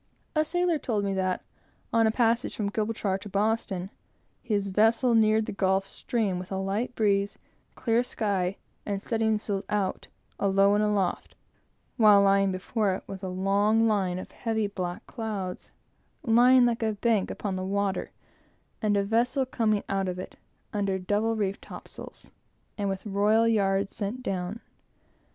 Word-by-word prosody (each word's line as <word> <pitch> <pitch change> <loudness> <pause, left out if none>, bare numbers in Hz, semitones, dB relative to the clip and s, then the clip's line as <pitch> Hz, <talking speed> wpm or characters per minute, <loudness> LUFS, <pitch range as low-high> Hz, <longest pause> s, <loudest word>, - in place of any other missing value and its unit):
A 310 - +4
sailor 345 0 0
told 215 -7 -1
me 200 -1 -1
that 185 -1 -1 0.5
on 225 -1 +4
a - - +3
passage 230 0 +1
from 200 -2 -2
Gibraltar 210 -3 -1
to 205 - -9
Boston, 200 -2 -1 0.5
his 210 -5 -1
vessel 225 +5 +3
neared 220 -1 +4
the - - -4
Gulf 195 0 +1
Stream 200 -2 -2
with 185 +1 -9
a 190 - -1
light 200 +6 -2
breeze, 200 -2 +1 0.4
clear 230 -1 +1
sky, 200 -6 -1 0.3
and 200 -1 -2
studding 220 -1 +1
sails 200 -2 -3
out, 200 -3 -1 0.3
alow 195 0 +4
and 210 +1 +2
aloft; 205 -3 -1 0.6
while, 200 -3 +6
before 190 +1 -1
it, - - -8
was 195 -1 -8
a 190 - -4
long 200 +4 +2
line 190 -4 +1
of 185 - -8
heavy, 220 -2 -1
black 185 -3 -4
clouds, 210 -6 -5 0.5
lying 245 +1 +6
like 235 -1 0
a 220 -1 +1
bank 210 -1 +1
upon 200 -3 -3
the 185 - -3
water, 195 0 -1 0.7
and 210 -1 +2
a 200 - +2
vessel 240 +6 +1
coming 220 -5 0
out 195 -1 -1
of 180 0 -3
it, 185 - -7 0.4
under 200 -2 0
double 205 +4 0
reefed 200 -2 -2
topsails, - - -11 0.4
and 200 -2 -2
with 195 +1 -4
royal 210 +3 +3
yards 195 -3 +1
sent 220 +5 -4
down. 190 +2 -3
205 Hz, 155 wpm, -27 LUFS, 195-225 Hz, 0.7 s, while